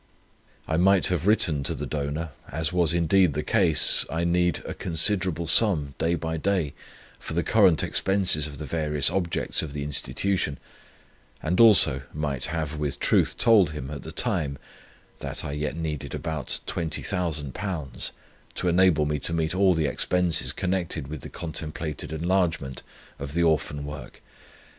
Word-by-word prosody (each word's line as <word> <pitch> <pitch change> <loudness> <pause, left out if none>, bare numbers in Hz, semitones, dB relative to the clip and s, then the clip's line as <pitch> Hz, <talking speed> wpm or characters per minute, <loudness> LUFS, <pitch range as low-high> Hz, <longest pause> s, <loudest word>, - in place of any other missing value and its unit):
I 80 - 0
might 95 +2 +4
have 90 0 -1
written 85 -9 +3
to 70 - -2
the - - -5
donor 75 +2 -4 0.2
(as 80 +5 -2
was 85 -4 +3
indeed 85 0 +3
the 75 +2 -3
case), 85 -3 +5
I 80 +2 -2
need 90 -1 +1
a - - -5
considerable 90 0 0
sum 80 -6 +3
day 85 +1 +1
by 80 0 -4
day 90 -4 -1 0.5
for - - -7
the 85 - +1
current 95 -7 +3
expenses 95 -6 +1
of 70 -2 -10
the 75 - -6
various 75 -1 +1
objects 90 -2 -1
of 75 -3 -6
the 75 -1 -4
Institution, 75 +2 -2 0.9
and 85 +3 -1
also 105 - +7
might 70 -5 -1
have 80 -1 -4
with 70 -1 -3
truth - - +1
told 105 -9 +4
him, 70 -2 -6
at 75 - -6
that - - -10
time, 70 -2 -1 0.6
that - - -5
I - - -4
yet 75 0 -3
needed 80 -3 -5
about 80 -5 -3
Twenty 80 -2 -3
Thousand 80 -7 -3
Pounds, 80 -9 -4 0.4
to 90 - -2
enable 85 -3 +3
me 75 0 -1
to 80 - 0
meet 80 -1 -1
all 95 -1 +3
the 80 -1 0
expenses 85 -3 +1
connected 85 -4 -3
with 75 -1 -7
the - - -9
contemplated 80 -3 -6
enlargement 80 -5 -1 0.4
of 70 +2 -7
the 85 - +2
Orphan 75 -3 0
work. 75 -3 -9
80 Hz, 160 wpm, -25 LUFS, 75-90 Hz, 0.9 s, also